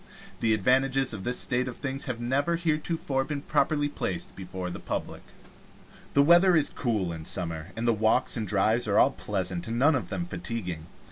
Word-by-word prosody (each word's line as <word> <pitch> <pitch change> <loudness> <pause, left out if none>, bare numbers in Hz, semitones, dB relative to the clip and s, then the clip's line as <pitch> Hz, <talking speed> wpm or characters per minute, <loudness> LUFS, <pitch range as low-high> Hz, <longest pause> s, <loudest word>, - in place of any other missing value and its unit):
The 110 -1 +3
advantages 130 +4 +2
of 100 -3 -6
this 125 +1 -1
state 125 -1 0
of 125 - -6
things 135 0 -3
have 125 -4 -4
never 140 +7 +1
heretofore 155 -4 -1
been 145 0 -5
properly 145 -2 +1
placed 90 -11 -4
before 90 -1 -6
the - - -6
public. - - -4 0.9
The 140 - +5
weather 175 +4 +6
is 155 -3 +3
cool 105 -9 -1
in 80 -1 -7
summer, 80 -2 -2
and 115 +1 -2
the 115 - +4
walks 110 +3 +2
and 110 -3 -3
drives 110 +5 +2
are 100 - +2
all 135 - +6
pleasant 95 -6 -3
and 115 +1 -3
none 145 +6 +5
of 130 - -2
them 175 - -3
fatiguing. 105 - -5
120 Hz, 190 wpm, -27 LUFS, 100-140 Hz, 0.9 s, weather